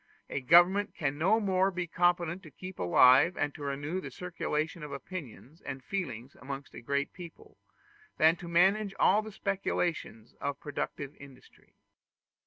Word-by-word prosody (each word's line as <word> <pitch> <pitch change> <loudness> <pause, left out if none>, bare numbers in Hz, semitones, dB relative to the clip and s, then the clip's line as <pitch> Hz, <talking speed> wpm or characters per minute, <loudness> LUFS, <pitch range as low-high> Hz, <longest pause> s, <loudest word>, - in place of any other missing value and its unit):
A 145 - -2
government 175 +9 +5
can 145 -1 -2
no 200 +7 +3
more 190 -2 +2
be 180 -2 -3
competent 175 +1 +1
to 165 - -12
keep 185 +5 -10
alive 130 - +5
and 145 -1 -1
to - - -12
renew 145 +6 -3
the - - -7
circulation 165 -2 -3
of 150 -1 -7
opinions 145 -1 -8
and 135 -1 -7
feelings 135 - -5
amongst 135 +2 -7
a - - -9
great 140 +3 -2
people, 170 -3 -12 0.6
than 160 +2 +5
to 175 - -9
manage 195 +4 +3
all 210 +3 +4
the 215 0 -9
speculations 180 - -3
of 140 0 -3
productive 145 -1 -5
industry. 140 -2 -16
165 Hz, 155 wpm, -30 LUFS, 140-185 Hz, 0.6 s, government